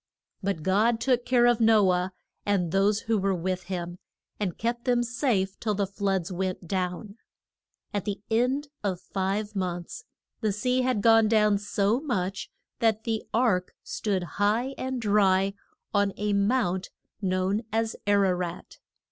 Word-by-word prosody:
But 190 -5 -2
God 220 +6 +3
took 245 -1 +1
care 245 -1 +4
of 240 -1 +3
No 215 -4 +5
ah, 180 +1 0 0.3
and 185 -5 0
those 200 +2 +2
who 225 -2 0
were 195 0 +1
with 180 +1 -2
him, 175 -1 -5 0.4
and 190 -5 -2
kept 235 +1 -2
them 245 -1 +3
safe 230 -6 0
till 215 -2 -1
the 200 0 +1
floods 195 -2 -1
went 185 -1 -3
down. 185 +3 -3 0.8
At 205 -2 -2
the 205 -2 -3
end 260 +6 +1
of 190 -3 -1
five 200 +3 -2
months 175 -2 -4 0.4
the 215 -3 0
sea 250 +5 +1
had 250 -5 0
gone 225 -1 +6
down 210 -2 +3
so 205 +2 +1
much 195 -10 -2 0.3
that 220 -1 +2
the 225 -1 -2
ark 215 -7 +1
stood 195 -4 -2 0.2
high 230 +6 +2
and 260 0 -3
dry 195 -3 +3 0.4
on 200 -1 +2
a 210 0 0
mount 200 -3 +1 0.3
known 190 +2 0
as 225 0 0
Ar 200 -1 +4
a 185 - +3
rat. 175 -1 -5
205 Hz, 155 wpm, -27 LUFS, 190-225 Hz, 0.8 s, gone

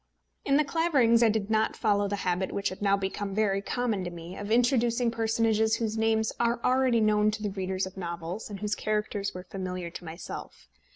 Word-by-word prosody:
In 275 - +4
The 305 - +4
Claverings 275 -7 +3
I 230 - +6
did 215 -1 -1
not 220 0 +2
follow 205 -1 +2
the 205 - -1
habit 180 +1 0
which 200 0 -1
had 185 - -9
now 200 -1 +3
become 195 0 -3
very 200 -2 +1
common 225 -2 -1
to 175 - -3
me, 170 +1 -9
of 205 0 -6
introducing 240 0 +2
personages 225 -1 +2
whose 220 -2 -2
names 220 0 +1
are 235 0 +1
already 255 -2 +3
known 210 -1 +3
to 215 0 -4
the 205 - -1
readers 190 0 -2
of 190 +1 -10
novels, 170 +3 -5
and 200 -2 -7
whose 210 0 -1
characters 210 -2 -2
were 180 - -6
familiar 180 -2 -5
to - - -8
myself. 160 - -8
210 Hz, 205 wpm, -28 LUFS, 190-230 Hz, -, I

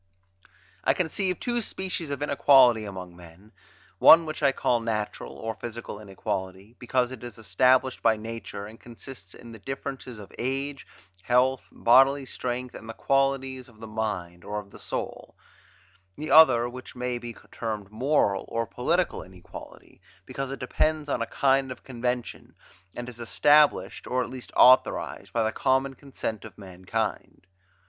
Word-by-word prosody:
I - - +3
conceive 185 +1 -1
two 240 -1 -1
species 190 -6 -4
of 140 +1 -3
inequality 130 -6 +5
among 90 -3 -8
men; 90 +4 -16 0.5
one 165 +1 +8
which 155 0 -5
I 140 -2 +4
call 120 -2 +1
natural, 110 -2 -3
or 110 0 -5
physical 115 -2 -7
inequality, 95 +1 -5
because 125 0 0
it 130 -2 -9
is 120 -4 -8
established 130 +3 +2
by 115 -1 +3
nature, 110 -2 -7
and 110 +2 -12
consists 115 -4 -12
in 120 - -12
the 110 - -11
difference 135 +4 -6
of 105 -5 -10
age, 135 +2 -3 0.3
health, 125 +4 +1
bodily 135 +3 +4
strength, 125 0 -4
and 110 - -10
the 115 - -6
qualities 135 -2 0
of 110 -2 -20
the 115 - -8
mind, 100 -6 -4
or 105 +1 -4
of 100 -1 -12
the - - -13
soul; - - -5 0.8
the 155 -1 -4
other 130 -6 +7
which 125 +1 -10
may 125 -1 -3
be 120 -1 -8 0.2
termed 105 -3 -5
moral, 110 -4 +1
or 115 0 -2
political 165 +11 0
inequality, 90 0 -13 0.2
because 135 -1 -5
it 135 - -5
depends 155 +3 0
on 125 - -1
a - - -1
kind 135 -1 +2
of 125 - -9
convention, 125 -1 -4 0.4
and 120 0 -6
is 120 -2 -9
established, 145 +8 +3
or 125 0 0
at - - -8
least 130 -1 -9
authorized, 130 +1 +4
by 115 - +1
the 110 - 0
common 135 +2 +1
consent 130 -6 -6
of - - -12
mankind. 95 +1 -4
120 Hz, 155 wpm, -26 LUFS, 110-135 Hz, 0.8 s, one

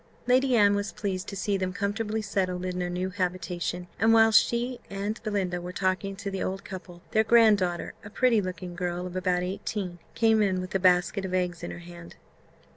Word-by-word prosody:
Lady 255 +1 +3
Anne 205 -3 +5
was 205 +1 -1
pleased 195 -1 -3
to 200 - -6
see 200 +1 0
them 185 -1 -2
comfortably 210 +2 -2
settled 185 -3 -1
in 180 0 -3
their 180 0 -1
new 180 +1 -2
habitation; 180 -1 -2
and 225 +2 +4
whilst 225 -1 +7
she 240 +1 -2
and 200 +3 -3
Belinda 190 -5 -1
were 180 +1 -6
talking 190 +1 -1
to 200 0 -5
the 195 - -3
old 190 +1 -3
couple, 180 -2 -9
their 220 - +4
grand 220 -2 +6
daughter, 175 -2 -2
a 205 - -9
pretty 230 0 +3
looking 185 -1 -5
girl 175 0 -3
of 180 0 -7
about 180 -1 +1
eighteen, 185 -1 -4 0.2
came 225 -1 +4
in 190 -3 +2
with 185 0 -6
a 195 - +2
basket 180 +2 +3
of 185 -1 -2
eggs 180 -1 -1
in 175 - -5
her - - -7
hand. 170 -1 -11
190 Hz, 205 wpm, -27 LUFS, 180-210 Hz, 0.2 s, whilst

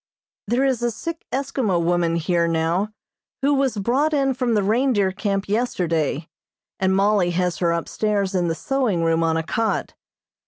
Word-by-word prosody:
There 245 +5 +2
is 260 -3 +1
a 240 - +1
sick 325 +8 -6
Eskimo 260 -8 0
woman 170 0 +1
here 170 +1 +1
now 165 +5 0 0.5
who 285 +1 +3
was 270 -5 +1
brought 270 +9 +1
in 270 -2 +2
from 250 -2 0
the 205 - +2
reindeer 215 -2 +2
camp 195 0 -2
yesterday, 170 - -1 0.5
and 190 0 +2
Mollie 200 -2 +3
has 180 -3 0
her 170 -2 +2
upstairs 200 +3 -1
in 180 -2 +1
the 165 - -1
sewing 235 -7 0
room 165 0 +2
on 160 0 +1
a 165 - -1
cot. 225 +6 -1
200 Hz, 165 wpm, -22 LUFS, 170-245 Hz, 0.5 s, who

